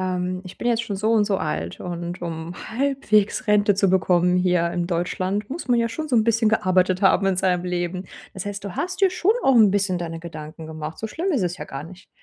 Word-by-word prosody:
ähm: 185 0 -2
„Ich 185 - -11
bin 240 - -1
jetzt 230 -1 +1
schon 215 -4 -4
so 215 +3 0
und 215 -2 +4
so 200 -2 0
alt 80 +3 -3
und 175 0 -5
um 165 0 -5 0.2
halbwegs 230 -4 +1
Rente 205 -1 +4
zu 195 0 +2
bekommen 180 -1 +3
hier 180 -2 +2
in 175 0 -2
Deutschland, 185 +4 -2
muss 300 -1 -6
man 240 -1 +4
ja 230 - +1
schon 310 +6 -5
so 250 - +2
'n 220 - +4
bisschen 225 -1 +3
gearbeitet 185 -2 +2
haben 195 0 +4
in 190 -1 +2
seinem 180 -1 +1
Leben.“ 180 +1 -3 0.3
Das 190 0 -6
heißt, 200 -1 -5
du 195 -3 -6
hast 365 +1 -3
dir 390 -2 +5
schon 370 +2 +2
auch 270 - +5
'n 220 -4 +6
bisschen 195 -2 +1
deine 165 -1 -5
Gedanken 160 -1 -9
gemacht, 155 0 -7
so 220 - -3
schlimm 350 - -2
ist 255 - +1
es 175 0 -1
ja - - -5
gar 135 +2 -7
nicht. 180 +3 -14
185 Hz, 240 wpm, -23 LUFS, 175-220 Hz, 0.3 s, n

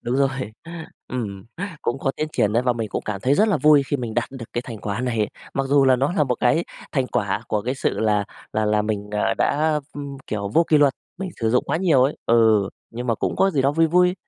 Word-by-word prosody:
Đúng 120 +2 -1
rồi. 135 -1 +3 0.8
Ừm, 100 -6 -5 0.4
cũng 120 - -1
có 135 - 0
tiến 155 - -2
triển 105 - +1
ấy 120 +3 +2
và 125 - +2
mình 115 -2 -4
cũng - - -3
cảm 100 -3 -4
thấy 130 +6 +2
rất 215 +7 +3
là 195 - +3
vui 150 0 +5
khi 145 - 0
mình 120 -4 -5
đạt 120 - -1
được 130 -4 -8
cái 120 - -2
thành 115 -4 -8
quả 100 +2 -3
này. 115 -4 0 0.3
Mặc 135 0 0
dù 140 -1 +4
là 130 -1 +5
nó 135 +7 0
là 150 -6 +2
một 125 - 0
cái 160 +8 +3 0.3
thành 135 -4 +1
quả 100 -4 -1
của 105 -1 0
cái 125 +4 -2
sự - - -1
là 105 -2 +2 0.3
là 110 0 0
là 105 0 +2
mình, 105 -1 -3
ờ, 105 - +1
đã, 150 0 +2
ừm, 140 -1 -6
kiểu, 100 -2 -3
vô 165 +10 +3
kỷ 155 - +5
luật, 145 -2 +5 0.3
mình 190 -2 -4
sử 115 -1 +1
dụng 125 - +2
quá - - -1
nhiều 165 -7 +3
ấy. 135 +3 +1
Ừ, 110 -4 +4 0.2
nhưng 120 +2 -6
mà 115 - +2
cũng - - -2
có 195 - +3
gì 140 -7 +1
đó 140 - +2
vui 165 +2 +3
vui. 180 +2 +3
125 Hz, 260 wpm, -22 LUFS, 110-145 Hz, 0.8 s, vui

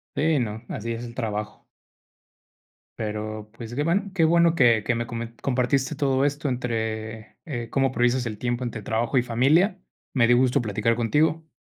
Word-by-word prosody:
Sí, 155 0 +2
no, 110 -1 -3
así 115 +2 -4
es 115 +1 -6
el 115 - -9
trabajo. 105 -3 -4 1.4
Pero, 110 0 -4
pues 115 0 -8
que 145 - 0
bueno, 195 +4 0
que 165 -4 +4
bueno 170 0 +4
que 115 -7 +4
que 120 - 0
me 120 - -2
comen 115 0 -6
compartiste 130 +1 +1
todo 135 -1 +1
esto 145 0 -1
entre, 110 -3 -4
eh, 120 -7 -5
cómo 135 -1 +1
priorizas 125 0 +1
el 110 -3 -5
tiempo 120 0 -1
entre 120 -2 -4
trabajo 115 +5 0
y 125 - 0
familia. 145 - +3 0.3
Me 125 -4 +4
dio 120 +1 +5
gusto 125 -1 +2
platicar 110 +2 0
contigo. 155 +7 +1
120 Hz, 175 wpm, -25 LUFS, 115-140 Hz, 1.4 s, dio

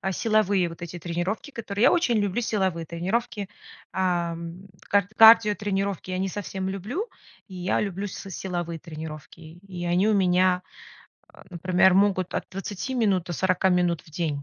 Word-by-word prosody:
а, 190 - -2
силовые 205 -3 +2
вот 165 +1 -11
эти 175 0 -6
тренировки 175 - -3
которые, 210 -1 -2
я - - +6
очень 330 -10 +2
люблю 205 +2 0
силовые 190 -7 -1
тренировки. 195 +5 -2 0.4
Ам, 175 0 -2 0.2
кар 200 -2 +3
кардиотренировки 205 -4 +5
я 185 - -2
не 190 - 0
совсем 190 -1 -4
люблю, 220 - -4 0.4
и 190 - -12
я 180 0 0
люблю 200 0 -3
с 195 - -8
силовые 175 -3 -4
тренировки. 155 -1 -9 0.3
И 175 -2 -5
они 180 +5 +2
у 215 - +3
меня, 180 -1 +3 0.7
а, - - -16
например, 185 +1 +3
могут 190 -2 +2
от - - -2
20 195 +6 -5
минут 200 -7 +1
до 175 - -4
40 185 +2 +1
минут 175 -3 +2
в 155 - -17
день. 150 -3 -2
185 Hz, 160 wpm, -25 LUFS, 175-205 Hz, 0.7 s, я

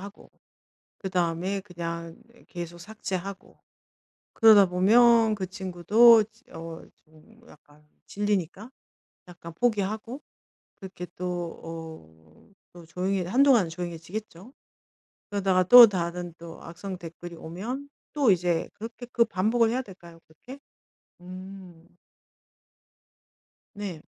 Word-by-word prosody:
하고 200 +2 -12 0.7
그다음에 185 +1 -1
그냥 170 -3 -7
네 235 0 -23
계속 175 -1 -8
삭제하고 195 -1 -7 0.7
그러다 215 -4 +7
보면 220 +4 +4
그 190 -2 -4
친구도 210 +4 +4 0.3
어 165 0 -8
좀 160 +9 -23
약간 150 0 -21 0.2
질리니까 205 +1 -2 0.6
약간 170 -1 -11
포기하고 220 - -2 0.5
그렇게 185 -2 -9
또 180 - -6 0.4
어 160 - -12 0.2
또 175 -2 -13
조용해 185 +3 -2
한동안은 245 -5 +4
조용해지겠죠. 175 +5 -7 0.8
그러다가 190 -2 +1
또 245 +5 +11
다른 175 -2 -4
또 165 -1 -11
악성 185 +3 -8
댓글이 170 0 -10
오면 230 +14 -7 0.2
또 285 -6 +3
이제 175 -2 -1
그렇게 230 +3 -9
그 235 - +4
반복을 225 +3 +1
해야 255 +2 -1
될까요 170 -5 -15
그렇게? 255 - -13 0.6
음. 185 -2 -11 1.9
네. 195 -6 -7
185 Hz, 230 characters per minute, -26 LUFS, 170-220 Hz, 1.9 s, 또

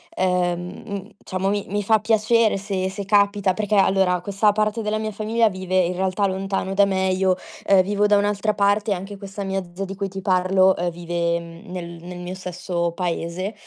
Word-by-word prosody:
ehm, 180 -1 +1 0.3
mhmm, 200 -1 -5
diciamo 185 +1 -1
mi 205 0 -1
mi 205 +1 -1
fa 220 +2 +4
piacere 220 0 +3
se 190 -1 -2
se 200 +1 -6
capita. 200 -1 +3
Perché, 210 +1 -1
allora, 190 -2 +3
questa 200 +2 +2
parte 215 +1 0
della 215 0 -1
mia 215 0 -3
famiglia 220 +2 +1
vive, 185 -1 -4
in 180 0 +1
realtà, 190 +2 0
lontano 195 0 -2
da 200 +1 +5
me, 190 -1 0
io, 185 0 +2 0.3
ehm, 195 -1 +6
vivo 205 +2 +1
da 205 0 +5
un'altra 205 +1 +1
parte 205 +2 +2
e - - +5
anche 195 +3 -7
questa 200 0 -7
mia 195 0 -1
zia 195 - -3
di 195 - -7
cui 195 0 -2
ti 195 0 -7
parlo, 185 0 +3
ehm, 175 +1 0
vive 170 0 -1 0.3
nel 180 -1 -5 0.2
nel 180 +1 -8
mio 180 +1 -5
stesso 180 -2 -3
paese, 180 +2 -3
195 Hz, 200 wpm, -22 LUFS, 185-205 Hz, 0.3 s, ehm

